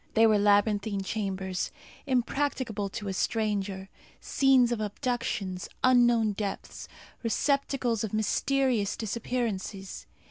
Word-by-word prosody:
They 225 0 +6
were 215 -2 +4
labyrinthine 205 0 +2
chambers, 190 -2 -2 0.4
impracticable 255 -5 -1
to 205 +1 -6
a 195 - -2
stranger; 200 -2 -1 0.3
scenes 265 -3 +3
of 235 -2 -1
abductions; 215 -4 -3
unknown 240 -3 +4
depths, 200 0 -5 0.4
receptacles 250 -1 0
of 220 - -3
mysterious 230 0 +1
disappearances. 215 -3 -3
220 Hz, 100 wpm, -28 LUFS, 200-245 Hz, 0.4 s, They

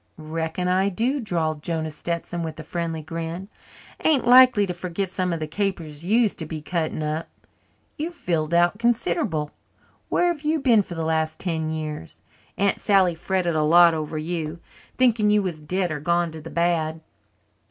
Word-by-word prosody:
"Reckon 160 +3 -3
I 190 +2 +2
do," 240 +9 0
drawled 160 - -1
Jonah 160 -1 -2
Stetson 170 +2 -4
with 160 -1 -5
a - - -6
friendly 165 -1 -4
grin. 165 +4 -5 0.5
"Ain't 300 -5 +3
likely 250 -4 +7
to 180 - -3
forget 180 +2 -3
some 185 -1 -1
of 165 - -2
the 155 - -2
capers 165 -3 -3
you 215 +7 +3
used 220 -4 0
to 160 - -4
be 155 0 -5
cutting 155 0 -2
up. 155 +2 -2 0.7
You've 335 +3 -3
filled 160 - -1
out 175 +4 +3
considerable. 230 - 0 0.6
Where 355 - +2
have 335 -4 -3
you 310 +1 +1
been 240 -6 +4
for 180 -3 -8
the 165 -1 -2
last 160 0 0
ten 160 -3 -2
years? 155 - -6 0.3
Aunt 200 0 +1
Sally 190 -4 +4
fretted 175 +1 -1
a 155 - +2
lot 170 +2 +6
over 155 0 -3
you, 160 0 -3 0.4
thinking 230 -4 +3
you 210 -1 +3
was 170 -5 -4
dead 180 +3 -1
or 150 - -3
gone 170 +2 +1
to 160 0 -9
the 165 - -9
bad." 165 -2 0
170 Hz, 180 wpm, -24 LUFS, 160-195 Hz, 0.7 s, likely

